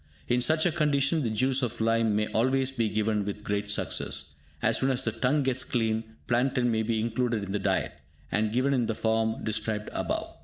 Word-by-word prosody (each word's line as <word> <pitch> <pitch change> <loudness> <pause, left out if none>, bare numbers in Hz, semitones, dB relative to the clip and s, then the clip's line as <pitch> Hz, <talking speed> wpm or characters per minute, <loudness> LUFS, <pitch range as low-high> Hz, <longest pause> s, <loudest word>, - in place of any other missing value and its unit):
In 125 0 +2
such 155 +5 +2
a 175 - +3
condition, 150 -1 +2
the 120 - 0
juice 130 +5 +1
of 125 -4 -2
lime 115 -1 +2
may 105 0 +2
always 130 +3 +1
be 115 -4 0
given 105 -1 0
with 105 +1 -5
great 105 0 -2
success. 70 -7 -2 0.3
As 110 +6 +2
soon 135 - +2
as 130 -2 +1
the 110 - 0
tongue 130 +6 +1
gets 130 -1 +1
clean, 110 -1 -1
plantain 125 0 +1
may 110 -1 +1
be 110 0 0
included 115 -1 0
in 100 - -5
the 105 - 0
diet, - - 0 0.4
and 110 0 +1
given 130 +4 +2
in 120 -4 +1
the 115 - -1
form 110 0 0
described 110 -1 -2
above. - - -2
115 Hz, 205 wpm, -28 LUFS, 110-130 Hz, 0.4 s, a